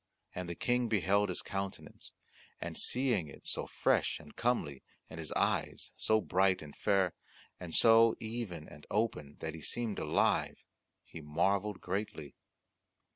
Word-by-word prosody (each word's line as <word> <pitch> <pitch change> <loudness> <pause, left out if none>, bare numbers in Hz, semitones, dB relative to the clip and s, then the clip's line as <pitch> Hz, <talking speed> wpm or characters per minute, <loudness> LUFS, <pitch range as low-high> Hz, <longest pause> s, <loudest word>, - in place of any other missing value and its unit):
And 90 -1 -5
the 85 - -4
King 125 +4 +1
beheld 100 -1 +2
his 90 - -3
countenance, 95 +1 -5 0.5
and - - -5
seeing 120 - +1
it 70 - -13
so - - -1
fresh - - +1
and 75 0 -14
comely, 115 - 0 0.3
and 80 - -7
his 80 - -3
eyes - - 0
so 110 0 +3
bright 95 -3 +2
and 75 -2 -11
fair, 95 -3 +2 0.5
and 90 -2 -7
so 115 0 +7
even 110 -8 -5
and 75 - -13
open 95 -10 -1
that 80 - -3
he 80 - -8
seemed 115 +2 -2
alive, - - +1 0.4
he 80 - -10
marvelled 95 +7 0
greatly. 90 -6 -4
95 Hz, 145 wpm, -33 LUFS, 80-110 Hz, 0.5 s, so